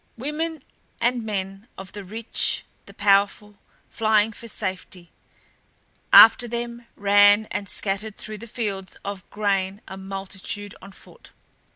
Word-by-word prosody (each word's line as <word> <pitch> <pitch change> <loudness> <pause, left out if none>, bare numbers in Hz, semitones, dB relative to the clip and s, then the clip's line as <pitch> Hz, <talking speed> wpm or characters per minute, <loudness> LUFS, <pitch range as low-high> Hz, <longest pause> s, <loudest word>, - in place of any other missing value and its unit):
Women 300 +3 -4 0.4
and 240 0 +1
men 195 0 -5
of 190 0 -9
the 205 - -8
rich, 220 +5 0 0.2
the - - -13
powerful, 200 +1 +1 0.3
flying 220 -1 +2
for 230 +2 -11
safety; 185 -5 -5 1.0
after 235 +2 +9
them 235 0 -5
ran 205 +1 +5
and 200 0 -4
scattered 200 +1 -3
through 215 -1 -7
the 230 - -10
fields 200 -5 -4
of 200 -2 -6
grain 195 -1 -1
a 190 - -8
multitude 195 +1 -6
on 195 - -11
foot. - - -17
205 Hz, 130 wpm, -23 LUFS, 195-225 Hz, 1.0 s, after